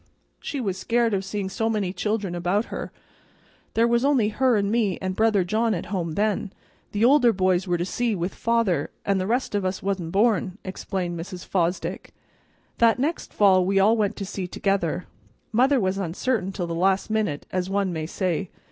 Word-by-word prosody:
"She 285 - -4
was 195 -6 -2
scared 230 +2 +1
of 195 -1 0
seeing 195 0 -3
so 225 +4 -1
many 205 -5 -1
children 210 -3 -2
about 180 +5 0
her; - - -5 0.8
there 230 +1 +4
was 235 +1 +2
only 270 -7 +3
her 255 +2 +2
and 200 0 0
me 215 -5 +1
and 185 0 -3
brother 215 -3 +3
John 215 +4 +1
at 180 +3 -6
home 170 -4 -2
then; 210 +1 0 0.4
the 210 +2 +2
older 255 -2 +6
boys 185 -2 +1
were 175 -1 +1
to 175 - -1
sea 230 +3 -1
with 180 +1 -3
father, 230 -10 +1 0.2
an' 200 -1 +2
the 185 - -2
rest 245 +2 0
of 205 -1 0
us 185 0 -2
wa'n't 190 -4 -2
born," 200 -2 +2
explained 185 -2 -4
Mrs. 180 +1 -7
Fosdick. 175 0 -2 0.6
"That 230 -1 +5
next 300 +6 -2
fall 190 -3 +4
we 195 +2 +2
all 210 +4 +5
went 210 -1 0
to 200 - -5
sea 190 -2 -4
together. 180 -2 -1 0.5
Mother 260 +4 +4
was 190 -1 0
uncertain 195 +3 -1
till 185 -2 -3
the 170 - -4
last 190 +4 +1
minute, 210 -10 -1
as 185 0 -1
one 195 -2 0
may 155 -1 -3
say. 185 0 -2
195 Hz, 190 wpm, -24 LUFS, 185-225 Hz, 0.8 s, older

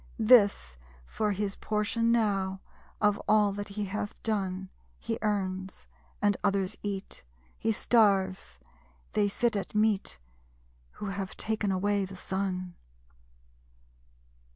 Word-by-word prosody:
This, 215 - +5 0.3
for 210 - -1
his 200 0 -2
portion 220 +2 0
now, 195 -4 +1 0.4
of 210 -1 +2
all 210 -1 +4
that 205 +1 -5
he 205 +1 -3
hath 205 +1 -5
done. 190 -3 -1 0.3
He - - -3
earns; 190 -3 -2 0.4
and 205 -1 +4
others 200 0 +1
eat. 200 -2 -5 0.4
He 225 - +1
starves; 195 - +2 0.6
they 210 -1 +3
sit 230 +3 0
at 200 +1 -4
meat 210 - +1 0.8
Who - - -7
have 195 -1 -5
taken 215 -2 0
away 200 +1 +1
the 190 0 -9
Sun. 185 -1 -3
200 Hz, 115 wpm, -29 LUFS, 190-210 Hz, 0.8 s, This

